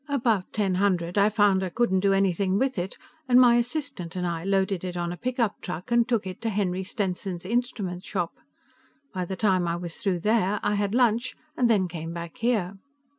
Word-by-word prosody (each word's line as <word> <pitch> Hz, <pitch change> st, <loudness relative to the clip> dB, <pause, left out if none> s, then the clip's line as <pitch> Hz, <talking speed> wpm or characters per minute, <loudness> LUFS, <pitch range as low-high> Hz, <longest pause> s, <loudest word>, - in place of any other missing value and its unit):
About 230 Hz, -9 st, +1 dB
ten 200 Hz, -4 st, 0 dB
hundred, 180 Hz, -4 st, +1 dB
I 200 Hz, +1 st, +5 dB
found 205 Hz, -3 st, +3 dB
I 185 Hz, -, -2 dB
couldn't 190 Hz, -1 st, +1 dB
do 200 Hz, +1 st, +2 dB
anything 195 Hz, 0 st, +2 dB
with 260 Hz, -3 st, 0 dB
it, 180 Hz, +2 st, -4 dB, 0.3 s
and 250 Hz, 0 st, +7 dB
my 240 Hz, -2 st, +6 dB
assistant 245 Hz, -, -2 dB
and 180 Hz, -1 st, -2 dB
I 170 Hz, -1 st, -2 dB
loaded 195 Hz, -1 st, 0 dB
it 180 Hz, -1 st, -4 dB
on 175 Hz, 0 st, -2 dB
a -, -, -4 dB
pickup 245 Hz, 0 st, -1 dB
truck 180 Hz, +5 st, -6 dB
and 235 Hz, 0 st, +4 dB
took 230 Hz, -5 st, +1 dB
it 185 Hz, -1 st, -7 dB
to 230 Hz, -, -1 dB
Henry 190 Hz, -3 st, -1 dB
Stenson's 185 Hz, -2 st, -3 dB
instrument 205 Hz, -5 st, -2 dB
shop. 170 Hz, -, -3 dB, 0.8 s
By 185 Hz, -2 st, -2 dB
the 190 Hz, -, -4 dB
time 185 Hz, -4 st, +2 dB
I 170 Hz, -, 0 dB
was 175 Hz, -1 st, -6 dB
through 195 Hz, -6 st, -1 dB
there, 210 Hz, -1 st, +2 dB
I -, -, +1 dB
had 205 Hz, +1 st, 0 dB
lunch 240 Hz, -1 st, +2 dB, 0.2 s
and 245 Hz, -2 st, +2 dB
then 200 Hz, -5 st, +3 dB
came 165 Hz, -1 st, -6 dB
back 170 Hz, -2 st, -7 dB
here." 205 Hz, -5 st, 0 dB
195 Hz, 205 wpm, -26 LUFS, 180-230 Hz, 0.8 s, and